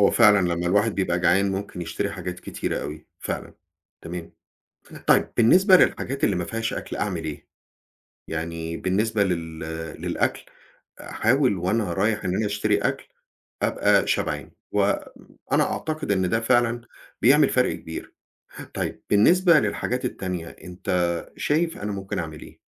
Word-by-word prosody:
هو 100 Hz, -, +6 dB
فعلًا 105 Hz, -3 st, +6 dB, 0.2 s
لمّا 85 Hz, +1 st, -2 dB
الواحد 105 Hz, +4 st, +2 dB
بيبقى 90 Hz, -2 st, 0 dB
جعان 95 Hz, +3 st, +3 dB
ممكن 95 Hz, -1 st, -5 dB
يشتري 100 Hz, +3 st, -3 dB
حاجات 90 Hz, -1 st, -6 dB
كتيرة -, -, -3 dB
أوي، 75 Hz, +2 st, -7 dB
فعلًا. -, -, -5 dB, 0.5 s
تمام. 85 Hz, 0 st, -7 dB, 0.7 s
طيب -, -, +4 dB
بالنسبة 185 Hz, -, +6 dB
للحاجات 135 Hz, -5 st, +1 dB
اللي 100 Hz, -, +2 dB
ما 90 Hz, -, -1 dB
فيهاش 115 Hz, +4 st, -3 dB
أكل -, -, -5 dB
أعمل 90 Hz, -6 st, -2 dB
إيه؟ 75 Hz, -2 st, -6 dB, 0.8 s
يعني 80 Hz, 0 st, -4 dB
بالنسبة 105 Hz, +3 st, +1 dB
لل 85 Hz, -4 st, -3 dB, 0.4 s
للأكل، -, -, -1 dB, 0.6 s
أحاول 125 Hz, -2 st, +1 dB
وأنا 95 Hz, +1 st, 0 dB
رايح 105 Hz, +3 st, 0 dB
إن 90 Hz, -, 0 dB
أنا 110 Hz, -, 0 dB
أشتري 105 Hz, 0 st, +1 dB
أكل -, -, -2 dB, 0.5 s
أبقى -, -, +3 dB
شبعان. -, -, -1 dB, 0.2 s
وأنا -, -, -1 dB
أعتقد 155 Hz, -7 st, -3 dB
إن 95 Hz, -2 st, +1 dB
ده 115 Hz, -, +2 dB
فعلًا 120 Hz, 0 st, +2 dB, 0.4 s
بيعمل 140 Hz, +4 st, +6 dB
فرق 125 Hz, 0 st, +2 dB
كبير. 80 Hz, -, -8 dB, 0.6 s
طيب -, -, -3 dB
بالنسبة 170 Hz, -, +5 dB
للحاجات 125 Hz, +1 st, -2 dB
التانية، 90 Hz, -8 st, -3 dB
أنتَ 90 Hz, -1 st, -2 dB
شايف 165 Hz, +3 st, 0 dB
أنا 105 Hz, 0 st, -3 dB
ممكن 95 Hz, -1 st, -4 dB
أعمل 80 Hz, -2 st, -5 dB
إيه؟ -, -, -13 dB
100 Hz, 140 wpm, -24 LUFS, 90-115 Hz, 0.8 s, هو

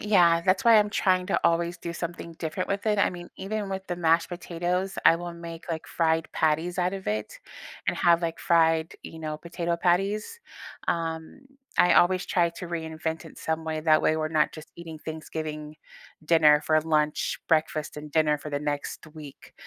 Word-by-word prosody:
yeah, 175 Hz, -5 st, +4 dB
that's 185 Hz, +9 st, +1 dB
why 230 Hz, -2 st, +8 dB
I'm 210 Hz, 0 st, +2 dB
trying 185 Hz, -3 st, +2 dB
to -, -, +1 dB
always 170 Hz, +1 st, +2 dB
do 170 Hz, -, -5 dB
something 170 Hz, 0 st, -6 dB
different 165 Hz, +3 st, -3 dB
with 200 Hz, +2 st, -2 dB
it. 210 Hz, -1 st, +2 dB
I -, -, +3 dB
mean, 175 Hz, -1 st, -9 dB
even 205 Hz, +1 st, -4 dB
with 190 Hz, 0 st, -5 dB
the 175 Hz, -, -3 dB
mashed 165 Hz, -1 st, +2 dB
potatoes, 180 Hz, +2 st, -3 dB
I 165 Hz, -, +7 dB
will 175 Hz, 0 st, -6 dB
make, 170 Hz, -1 st, -9 dB
like, 160 Hz, -1 st, -4 dB
fried 165 Hz, -1 st, +1 dB
patties 160 Hz, +4 st, 0 dB
out 180 Hz, +1 st, +1 dB
of 190 Hz, -, -7 dB
it 105 Hz, 0 st, -3 dB, 0.5 s
and -, -, 0 dB
have, 170 Hz, 0 st, +4 dB
like, 165 Hz, -1 st, -2 dB
fried, 165 Hz, -2 st, +2 dB
you 160 Hz, -, -9 dB
know, 155 Hz, -1 st, -4 dB
potato 170 Hz, +1 st, -3 dB
patties. 200 Hz, -, 0 dB, 0.5 s
Um, 165 Hz, -, -2 dB, 0.4 s
I 180 Hz, -, +6 dB
always 185 Hz, +1 st, +4 dB
try 170 Hz, -2 st, +2 dB
to 180 Hz, -, -6 dB
reinvent 160 Hz, -1 st, -4 dB
it 160 Hz, -, -12 dB
some 160 Hz, 0 st, -2 dB
way, 155 Hz, -1 st, -2 dB
that 155 Hz, -1 st, +4 dB
way 155 Hz, -, +3 dB
we're 155 Hz, 0 st, -1 dB
not 155 Hz, -1 st, +2 dB
just 155 Hz, 0 st, -11 dB
eating 165 Hz, -2 st, -9 dB
Thanksgiving 155 Hz, -1 st, -6 dB, 0.5 s
dinner 150 Hz, -2 st, +5 dB
for 155 Hz, 0 st, +4 dB
lunch, 155 Hz, -1 st, 0 dB
breakfast, 155 Hz, -2 st, 0 dB
and 150 Hz, 0 st, -8 dB
dinner 150 Hz, -1 st, +2 dB
for 150 Hz, -, -8 dB
the 145 Hz, -, -1 dB
next 145 Hz, 0 st, -4 dB
week, 150 Hz, -3 st, -12 dB
165 Hz, 190 wpm, -26 LUFS, 155-180 Hz, 0.5 s, why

